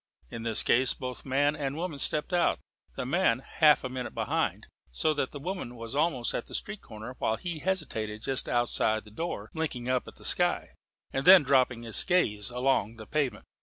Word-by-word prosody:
In 115 - -6
this 115 -1 0
case 130 +1 +3
both 125 +1 -7
man 145 +3 +2
and 140 -2 -3
woman 165 -3 -4
stepped 150 +5 +1
out, 175 -1 +2 0.4
the - - -3
man 145 -3 +2
half 150 +3 +3
a - - -2
minute 125 -1 -5
behind; - - -1 0.3
so 155 - +1
that 135 - -1
the - - -8
woman 175 -6 -5
was 115 +2 -6
almost 145 -6 +1
at - - -3
the - - -4
street 210 0 -3
corner 110 +3 -9
while 110 - +1
he 165 +7 -5
hesitated 115 - -2
just 135 -1 +3
outside 120 -2 +1
the 105 - -15
door, 110 -5 -5
blinking 135 -7 -3
up 130 -1 0
at - - -11
the - - -12
sky, - - +1 0.4
and 135 - -2
then 185 -3 +10
dropping 130 -3 +2
his 115 -1 +1
gaze 105 - +1
along 125 -3 0
the 110 -1 -10
pavement. 130 -5 -2
130 Hz, 200 wpm, -29 LUFS, 115-155 Hz, 0.4 s, then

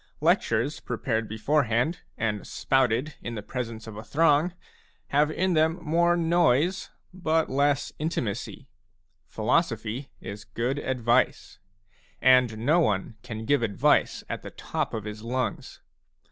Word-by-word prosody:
Lectures - - +1
prepared 110 0 -2
before 135 +7 +1
hand 125 +10 0 0.2
and 105 -3 -2
spouted 135 +2 +1
in 115 - -5
the 105 - -5
presence 115 -3 -5
of 110 -2 -9
a 110 - -7
throng 150 +7 +3 0.6
have 145 +2 +3
in 185 +3 0
them 160 +1 +3
more 170 +2 +2
noise 170 0 +2 0.2
but 165 -3 0
less 140 +1 +1
intimacy. 130 -4 -3 0.6
Philosophy 125 0 -1
is 100 +1 -8
good 125 +5 -2
advice; 125 -2 0 0.6
and 125 -4 +4
no 160 +6 +4
one 105 - 0
can 110 -3 -6
give 145 +1 +2
advice 105 -4 +2
at - - -4
the - - -8
top - - -3
of 110 - -4
his 105 0 -7
lungs. 125 +3 -3
130 Hz, 130 wpm, -26 LUFS, 110-155 Hz, 0.6 s, and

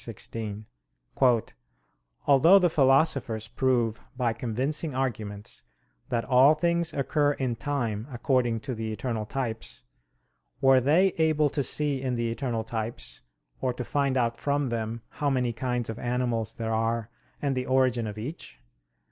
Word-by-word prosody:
iv, - - -7
16): 110 -2 -6 1.6
"Although 160 +8 +7
the 180 -3 +3
philosophers 135 -6 +2
prove 120 -2 0 0.2
by 120 -3 +1
convincing 130 +6 -2
arguments 105 -6 -3 0.5
that 115 -1 -1
all 135 +4 +6
things 170 +1 0
occur 145 +1 +1
in 130 -4 -2
time 115 -4 -2
according 120 -2 +1
to 130 - -4
the 110 -1 -4
eternal 110 -1 -3
types, 115 - -4 0.8
were 135 -1 +5
they 160 +9 +4
able 155 -2 +3
to 145 - 0
see 140 0 0
in 130 -2 -1
the 115 -1 -1
eternal 115 -2 -2
types, 110 - -5 0.4
or 130 -1 0
to 125 - -5
find 140 +1 0
out 115 -2 +1
from 140 -2 0
them 115 0 -3
how 145 - -1
many 125 -3 0
kinds 125 0 -2
of 110 0 -5
animals 120 -2 -1
there 115 -1 -2
are 115 0 -1 0.3
and 140 -2 -1
the 130 0 -2
origin 130 -3 +2
of 105 0 -6
each? 110 - -7
125 Hz, 150 wpm, -27 LUFS, 115-140 Hz, 1.6 s, Although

